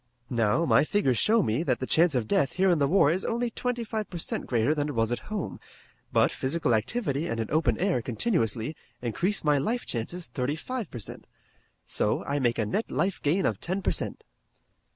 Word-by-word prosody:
Now, 115 +7 +2
my - - +5
figures 155 - +1
show 220 -1 +4
me 115 +3 0
that 130 -8 0
the 130 - -2
chance 165 +2 +3
of 120 -4 0
death 135 - +2
here 190 0 +3
in 170 - +2
the 140 - +3
war 155 -2 +4
is 185 +3 -1
only 235 +1 -1
twenty 245 0 -2
five 220 -1 -4
per 175 - -6
cent 165 - -2
greater 120 +3 +2
than 150 -1 -1
it 145 - -4
was 115 0 +1
at 120 - -1
home, 210 -4 -4 0.5
but - - +3
physical 135 -2 0
activity 140 - 0
and 115 - -2
an 110 - -3
open 150 -8 +2
air 180 -8 +1
continuously 120 - -1 0.3
increase 180 - 0
my 150 -2 +3
life 235 - -1
chances 165 +10 -4
thirty 135 0 -2
five 240 +4 -4
per - - -7
cent. 110 - -7 0.6
So, - - 0
I 145 +1 -1
make 120 -3 +1
a 110 - +1
net 115 - -2
life 190 -1 -1
gain 175 +6 +1
of - - 0
ten 185 +2 -2
per - - +2
cent." - - -2
150 Hz, 215 wpm, -27 LUFS, 120-195 Hz, 0.6 s, my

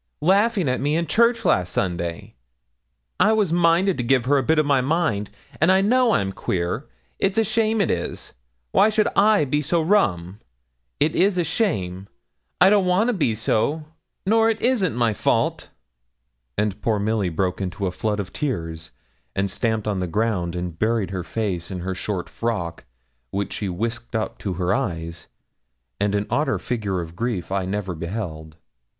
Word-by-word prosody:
laughing 200 +1 +3
at 125 0 0
me 145 +3 +1
in 170 +1 +1
church 235 +7 +2
last 90 -1 +2
Sunday. 85 -2 -3 0.9
I 220 - +5
was 205 -6 +1
minded 175 +2 +3
to - - 0
give 125 0 +2
her 140 +2 +3
a - - -1
bit 160 +5 +2
of 155 - +3
my 140 -2 +3
mind. 135 - 0 0.3
An' 160 - +5
I 190 +1 +5
know 240 +3 +3
I'm 95 - +1
queer. 90 +7 -2 0.3
It's 195 +2 0
a 225 - +5
shame, 220 +1 +1
it 200 - +2
is. 85 - -4 0.4
Why 210 - +5
should 215 0 +2
I 205 -5 +4
be 145 +2 0
so 165 +4 +1
rum? 105 - +1 0.6
it 155 +2 +2
is 195 0 +3
a 175 - +2
shame! 100 - -1 0.5
I 195 - +7
don't 200 -3 +4
want 190 +6 +3
to - - +2
be 145 - +1
so, 140 +8 0 0.4
nor 225 +3 +4
it 220 -1 -1
isn't 230 - +1
my 115 -3 +2
fault.' - - 0 0.9
And 105 -1 -1
poor 110 -2 +1
Milly 105 -2 0
broke 90 +3 -1
into 95 +1 -3
a 90 - 0
flood 105 +2 -2
of 100 -1 -5
tears, 80 - -4 0.4
and 95 0 0
stamped 110 -2 -1
on 100 -3 0
the 90 - -1
ground, 90 -2 -1
and 90 -2 -5
buried 110 -4 0
her 95 -2 -3
face 90 -1 -3
in 95 -2 -5
her 95 +2 -3
short 95 0 -3
frock, 95 -8 -3 0.4
which 100 +4 -3
she 100 - -3
whisked 115 +6 -4
up 110 - -2
to 95 - -3
her 90 +1 0
eyes; 85 -3 -3 0.7
and 100 0 +1
an 100 0 0
odder 150 - +1
figure 105 -7 -2
of 85 0 -9
grief 105 -4 -3
I 95 -1 0
never 95 -1 -3
beheld. 80 -3 -5
110 Hz, 180 wpm, -23 LUFS, -, 0.9 s, I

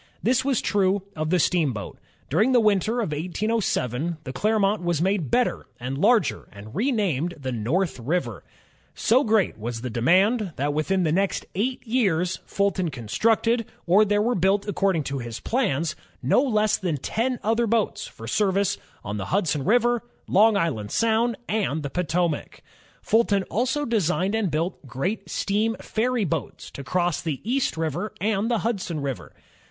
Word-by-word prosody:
This 255 +2 +2
was 270 -3 +1
true 195 -1 +1
of 155 0 -2
the 180 - +3
steamboat. 145 - 0 0.3
During 215 - +2
the 245 - +6
winter, 215 +2 +2
of 205 - -2
1807 170 - -1
the 130 - -6
Clermont 210 +5 +1
was 175 -3 0
made 185 -4 0
better 250 - +1
and 130 +2 -4
larger, 215 - +2
and 105 +2 -11
renamed 190 - 0
the 130 -2 -4
North 130 - -1
River, 120 - -2 0.5
So 250 +5 +3
great 215 - +1
was 115 +1 -4
the 125 -1 -4
demand, 185 - +2
that 145 +2 -1
within 180 +5 +1
the 160 - +1
next 195 +4 0
eight 250 +8 -2
years 190 -8 +1
Fulton 195 -3 0
constructed, 225 - +1 0.2
or 190 +5 +5
there 205 0 +2
were 240 +2 +1
built 195 +2 +1
according 195 -5 +1
to 140 0 -3
his 120 -2 -6
plans, 170 - 0 0.3
no 135 - +4
less 215 -6 +2
than 175 -6 -2
ten 245 - -1
other 225 +2 +1
boats 225 -1 0
for 115 - -11
service 200 - +1 0.2
on 100 +1 -4
the 100 - -4
Hudson 165 -7 0
River, 240 - +3 0.2
Long 210 +2 +4
Island 135 - -1
Sound, 230 - +2
and 190 -8 -1
the 140 - -4
Po 180 - 0
tomac. 170 -2 -1 0.4
Fulton 205 -3 +2
also 260 +6 0
designed 195 - +1
and 220 -4 +1
built 160 -1 -3
great 160 - -3
steam 215 +3 0
ferry 235 0 0
boats 165 -4 -4
to 140 - -8
cross 175 +2 0
the 155 -5 -3
East 250 -5 0
River 165 +6 -2
and 210 +3 0
the 235 - +2
Hudson 190 -8 -2
River. 135 -3 -5
190 Hz, 165 wpm, -24 LUFS, 155-220 Hz, 0.5 s, the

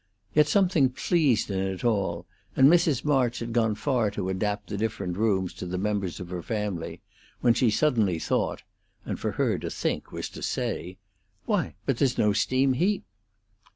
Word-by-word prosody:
Yet 150 -1 +5
something 175 -8 +3
pleased 130 - +1
in 95 - -1
it 95 -1 -3
all, 95 -7 0 0.3
and 135 - +7
Mrs. 160 -5 +3
March 130 -5 +2
had 115 -1 -4
gone 110 -2 +2
far 120 -1 +1
to 100 -2 -3
adapt 105 +2 -2
the 105 - -3
different 105 -4 -2
rooms 95 -3 +1
to 90 - -7
the 90 +1 -3
members 100 -2 -2
of 90 0 -8
her 90 -1 -3
family, 105 -4 -4 0.4
when 120 -2 +5
she 120 0 +3
suddenly 110 - +2
thought 80 - -1 0.4
(and - - -4
for - - -2
her - - 0
to - - -4
think - - -3
was - - -4
to - - -10
say), 90 +3 -3 0.5
"Why, - - 0
but 135 - 0
there's 130 -2 +1
no 105 -1 +3
steam 130 +6 +2
heat!" 185 +9 +1
110 Hz, 180 wpm, -27 LUFS, 95-130 Hz, 0.5 s, and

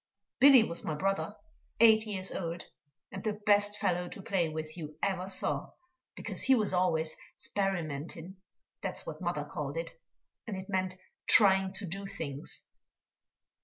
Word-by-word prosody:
Billy 265 -3 +9
was 170 -5 -3
my 155 - -2
brother, 195 +5 -1 0.4
eight 220 -1 +6
years 190 -3 -3
old, 170 -1 -4 0.5
and - - -6
the 215 -2 0
best 205 0 +2
fellow 180 0 0
to 195 - -9
play 180 -5 +1
with 155 0 -5
you 155 -3 -8
ever 190 -2 0
saw, 195 - -1 0.4
because - - -6
he 265 - +5
was 215 -5 +1
always 165 -3 +1 0.2
"sperimentin" 175 -2 -3 0.4
that's - - -3
what - - -7
mother - - -1
called - - -4
it, - - -3 0.6
and 205 -4 -3
it 190 0 -7
meant 185 -1 -1 0.3
trying 190 -2 +6
to 195 - -3
do 195 +3 -5
things. 150 -8 -6
190 Hz, 150 wpm, -31 LUFS, 170-205 Hz, 0.6 s, Billy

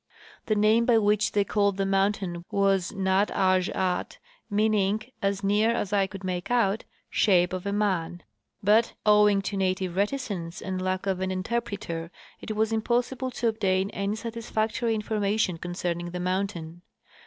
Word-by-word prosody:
The 215 - +2
name 215 +3 +4
by 235 -2 +5
which 210 -1 +2
they 205 - +3
called 200 -1 +1
the 195 - 0
mountain 195 -3 0
was 195 -2 +1
Nat 190 +1 +1
azh 185 -1 +2
at, 180 -1 -2 0.3
mean 215 +1 +2
ing, 205 +1 +1 0.2
as 200 0 -1
near 205 +3 +3
as 210 -4 -1
I 195 -1 +3
could 195 0 -9
make 180 -1 -3
out, 225 -4 +1 0.2
" - - -48
shape 180 -3 +4
of 185 +1 -4
a - - 0
man; 180 -5 -1 0.2
" - - -45
but, 215 +3 +3
owing 210 -1 +5
to 200 - -3
native 185 -1 -1
reticence 200 -5 -2
and 185 -1 -4
lack 185 +1 -1
of 190 -2 0
an 190 0 -1
interpreter, 185 -4 -3 0.3
it 215 - -5
was 220 +1 +1
impossible 245 +3 0
to 245 -1 -2
obtain 195 -3 +1
any 200 +1 -2
satisfactory 225 0 -2
information 210 -4 0
concerning 175 0 -3
the 180 +1 -5
mountain. 180 -2 -3
200 Hz, 165 wpm, -27 LUFS, 185-215 Hz, 0.3 s, by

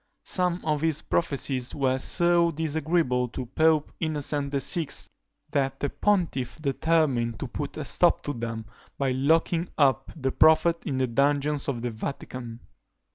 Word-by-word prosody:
Some 180 -1 +1
of 150 -2 0
his 160 -2 +1
prophecies 135 -5 -1
were 130 -2 +1
so 170 +3 +4
disagreeable 155 -4 0
to 125 +1 -6
Pope 155 +4 +2
Innocent 145 -3 -1
VI., 150 +3 0 0.6
that 135 -2 -1
the 145 - -2
pontiff 170 -11 0
determined 140 -5 +1
to - - -3
put - - -6
a - - -4
stop - - +3
to 145 - -3
them, 115 -2 -5 0.3
by 135 -2 0
locking 165 +6 +1
up 135 -2 +2
the 135 -4 -2
prophet 160 +3 +4
in 135 - -1
the 130 - +2
dungeons 140 +3 +1
of 120 -4 -3
the 120 - -2
Vatican. 120 0 -7
145 Hz, 145 wpm, -26 LUFS, 130-160 Hz, 0.6 s, so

